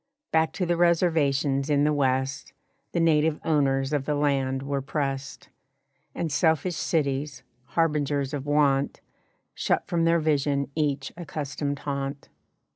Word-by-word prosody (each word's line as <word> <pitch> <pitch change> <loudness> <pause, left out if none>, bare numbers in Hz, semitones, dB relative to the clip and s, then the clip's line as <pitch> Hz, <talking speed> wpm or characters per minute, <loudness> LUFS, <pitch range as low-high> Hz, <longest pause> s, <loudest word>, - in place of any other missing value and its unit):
Back 160 0 +2
to 185 - -1
the 175 0 0
reservations 150 -5 +2
in 145 -1 +3
the 150 0 +3
West 135 0 -1 0.4
The 170 - -1
native 160 -1 +3
owners 135 -3 +1
of 145 -2 0
the 150 - 0
land 135 -2 0
were 140 0 -2
pressed, 135 -1 -4 0.7
And 165 - -2
selfish 160 +3 +1
cities, 145 -2 -1 0.2
harbingers 145 -3 0
of 145 -1 -4
want, 145 -2 +2 0.5
Shut - - 0
from 170 -1 0
their 165 0 +4
vision 140 -3 0
each 145 -3 -1
accustomed 145 -3 -4
haunt. 140 0 -4
145 Hz, 130 wpm, -26 LUFS, 140-155 Hz, 0.7 s, their